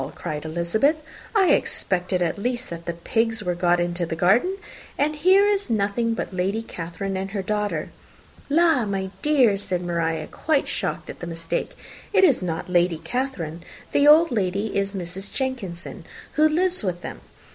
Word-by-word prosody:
cried 150 0 -5
Elizabeth. 170 - +1 0.4
"I 385 -4 +5
expected 180 -7 0
at 170 +3 -1
least 245 +1 -2
that 170 0 -7
the 170 - -2
pigs 225 +6 -1
were 180 -2 0
got 175 0 +2
into 175 0 -1
the 165 -1 -2
garden, 230 - +3 0.4
and 300 +2 +1
here 375 +6 +5
is 405 -6 0
nothing 225 +2 +1
but 205 - -4
Lady 195 +5 -1
Catherine 180 0 -5
and 190 +1 -3
her 195 -1 -3
daughter!" 205 -6 -1 0.6
"La! 320 -4 +4
my 195 -2 -2
dear," 260 -9 +4
said 185 -3 -2
Maria, 165 -2 -1
quite 305 - 0
shocked - - -3
at - - -14
the 175 - -6
mistake, 165 0 -3 0.4
"it - - +5
is 285 - +5
not 165 -3 -3
Lady 175 -2 +2
Catherine. 170 - -3 0.3
The 285 - +4
old 320 +2 +7
lady 200 -1 -1
is 200 0 -1
Mrs. 190 +2 -5
Jenkinson, 240 -11 -4 0.3
who 310 +1 +4
lives 360 +3 +1
with 175 -3 -2
them. - - -7
195 Hz, 170 wpm, -24 LUFS, 175-260 Hz, 0.6 s, old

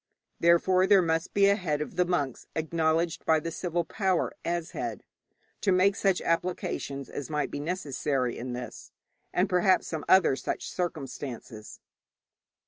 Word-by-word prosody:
Therefore 185 +2 +4
there 195 -2 +6
must 165 0 0
be 200 -1 +4
a 200 - +5
head 160 -7 -1
of 150 - -5
the 180 - +3
monks 145 -8 -2
acknowledged 160 +1 0
by 160 -1 +3
the 165 +2 -5
civil 175 0 -2
power 190 0 0
as 170 -1 -2
head, 115 -4 -4 0.6
to 200 - +2
make 190 +2 +4
such 195 -3 +1
applications 165 -5 -2
as 145 - -6
might 150 -1 -1
be - - -4
necessary 145 -6 -1
in 125 +1 -5
this, 125 0 -8 0.4
and 180 +3 +2
perhaps 185 +1 +3
some 160 -3 -4
other 185 -7 +6
such - - -4
circumstances. 135 -9 -6
165 Hz, 150 wpm, -28 LUFS, 145-185 Hz, 0.6 s, there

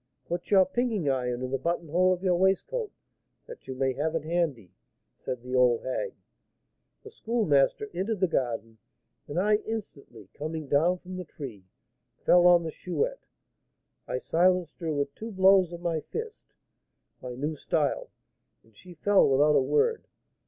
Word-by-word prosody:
'Put 175 +1 -4
your 190 -2 +6
"pinking 215 - -1
iron" 125 -2 -1
in 130 - -4
the 135 - -1
buttonhole 170 +3 +1
of 180 0 -2
your 185 -2 +3
waistcoat, 195 - 0 0.5
that 485 0 -12
you 130 - -5
may 130 0 0
have 155 +4 -2
it 160 - -1
handy,' 155 - -2 0.4
said 125 -2 -6
the 125 0 -7
old 125 -2 +3
hag. 130 - -3 0.9
The 430 - -11
Schoolmaster 215 - +1
entered 195 +4 -2
the 185 - +3
garden, 115 -7 -2 0.5
and 150 +4 -2
I 210 +2 +3
instantly, 140 - -8
coming 155 +1 -5
down 165 +7 +3
from 185 +1 -9
the 180 - -4
tree, 125 - -9 0.5
fell 180 0 +5
on 175 -1 +6
the 160 - -4
Chouette. 480 - -3 0.8
I - - -2
silenced 180 - +1
her 165 -3 -2
with 140 -1 -2
two 225 +7 -7
blows 190 -2 +5
of 170 0 -8
my 170 -2 -1
fist, 450 - -7 0.8
my 125 -1 -6
new 150 +5 -3
style, 150 0 -1 0.5
and 110 -1 -27
she 180 - -14
fell 200 +1 +4
without 145 +3 +4
a 140 - +5
word. 150 - +1
170 Hz, 160 wpm, -28 LUFS, 135-190 Hz, 0.9 s, your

